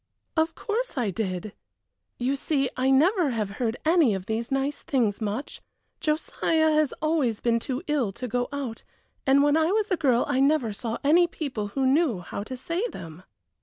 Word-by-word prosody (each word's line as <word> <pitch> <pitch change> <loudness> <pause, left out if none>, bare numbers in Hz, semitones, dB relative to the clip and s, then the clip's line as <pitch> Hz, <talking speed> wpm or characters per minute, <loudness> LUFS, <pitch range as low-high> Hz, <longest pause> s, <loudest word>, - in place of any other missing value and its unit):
"Of 320 0 +1
course 455 - -3
I 230 -6 0
did; 190 0 -3 0.6
you 255 +3 0
see, 275 -2 0
I 260 +1 +1
never 325 +5 +4
have 215 -5 -2
heard 230 0 0
any 315 - +4
of 190 -1 -5
these 230 +4 -3
nice 270 +2 -1
things 230 -7 0
much. 215 +6 -4 0.4
Josiah 315 +1 +1
has 305 -2 +2
always 295 -9 +1
been 230 -1 +1
too 260 +5 -4
ill 280 -9 0
to 250 - -5
go 245 +1 -1
out, 275 -5 -5 0.4
and 275 +1 +5
when 290 +1 +4
I 320 +2 +3
was 425 0 0
a - - +4
girl 255 -6 +2
I 280 -2 +1
never 275 -5 +2
saw 230 +2 -4
any 335 +5 +5
people 280 - -4
who 265 - +2
knew 275 - +3
how 175 - -6
to 255 +3 -6
say 335 - -2
them." 165 - -9
270 Hz, 185 wpm, -26 LUFS, 230-310 Hz, 0.6 s, and